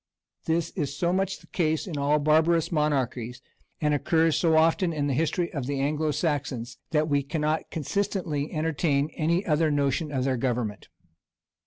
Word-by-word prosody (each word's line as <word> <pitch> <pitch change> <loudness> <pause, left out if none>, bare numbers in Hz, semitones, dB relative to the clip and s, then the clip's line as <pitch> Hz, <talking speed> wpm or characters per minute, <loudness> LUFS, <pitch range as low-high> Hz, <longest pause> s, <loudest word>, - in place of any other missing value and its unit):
This 165 0 0
is 140 0 -3
so 175 +2 +1
much 190 0 0
the - - -17
case 160 -3 0
in 175 -6 -5
all 145 +1 +2
barbarous 160 +3 +3
monarchies, 130 -6 -1 0.4
and 150 -1 +1
occurs 160 +2 +2
so 160 -2 +3
often 165 +3 +3
in 150 -3 -1
the 140 - 0
history 165 +4 0
of 140 -4 -3
the 140 -1 -2
Anglo 150 +3 0
Saxons, 145 -6 -2
that 155 -1 +1
we 145 -2 +2
cannot 155 +2 -2
consistently 165 -3 -2
entertain 155 -2 0
any 170 +4 +1
other 155 0 +2
notion 145 +1 0
of 130 -3 -1
their 130 -1 0
government. 120 -4 -2
150 Hz, 165 wpm, -26 LUFS, 140-165 Hz, 0.4 s, barbarous